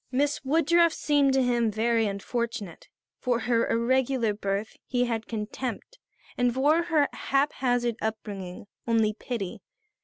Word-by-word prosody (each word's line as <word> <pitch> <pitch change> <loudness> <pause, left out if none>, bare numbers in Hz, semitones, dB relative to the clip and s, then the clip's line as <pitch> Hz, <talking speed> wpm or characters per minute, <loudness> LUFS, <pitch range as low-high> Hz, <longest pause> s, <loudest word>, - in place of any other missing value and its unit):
Miss 285 +3 0
Woodruff 330 +4 +3
seemed 290 -3 +2
to 265 -1 +3
him 240 -2 +2
very 225 +1 +1
unfortunate. 205 -2 -4 0.3
For 245 -2 0
her 230 0 +1
irregular 245 -1 +1
birth 200 +1 -3
he 245 -1 +1
had 225 -2 -3
contempt 235 - -5 0.4
and 245 0 +2
for 290 +7 +3
her 310 -4 +3
haphazard 245 -4 0
upbringing 205 -2 -5 0.2
only 225 -2 +2
pity. 210 -4 -5
240 Hz, 125 wpm, -27 LUFS, 220-270 Hz, 0.4 s, Woodruff